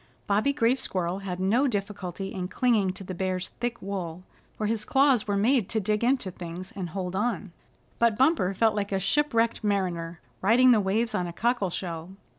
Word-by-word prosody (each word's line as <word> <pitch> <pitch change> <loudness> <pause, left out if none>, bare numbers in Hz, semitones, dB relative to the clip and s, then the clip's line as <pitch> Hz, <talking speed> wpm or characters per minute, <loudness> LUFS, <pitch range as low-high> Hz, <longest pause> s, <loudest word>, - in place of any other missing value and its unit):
Bobby 210 +7 +2
Gray 240 -4 +3
Squirrel 185 -7 -2
had 185 -2 -5
no 225 +9 +3
difficulty 200 -4 -4
in 185 -2 -3
clinging 215 -3 +2
to 195 - -9
the 185 - -6
Bear's 185 0 -2
thick 240 0 -2
wool, 185 -3 -4 0.3
for 215 - -2
his 215 0 -1
claws 265 -3 +3
were 200 -1 +1
made 230 0 +2
to 220 - 0
dig 210 +2 0
into 250 -6 +1
things 180 +4 -8
and 185 -3 -4
hold 180 +1 -4
on; 210 -2 -1 0.5
but 235 -2 +3
Bumper 260 - +3
felt 220 +2 +3
like 205 -1 -2
a 195 - +1
shipwrecked 230 +1 +1
mariner 175 -5 -1 0.2
riding 245 +6 +6
the 220 -3 +5
waves 215 +4 0
on 180 - -1
a 170 - -6
cockle 235 -2 0
shell. 170 -1 -5
200 Hz, 190 wpm, -27 LUFS, 185-230 Hz, 0.5 s, riding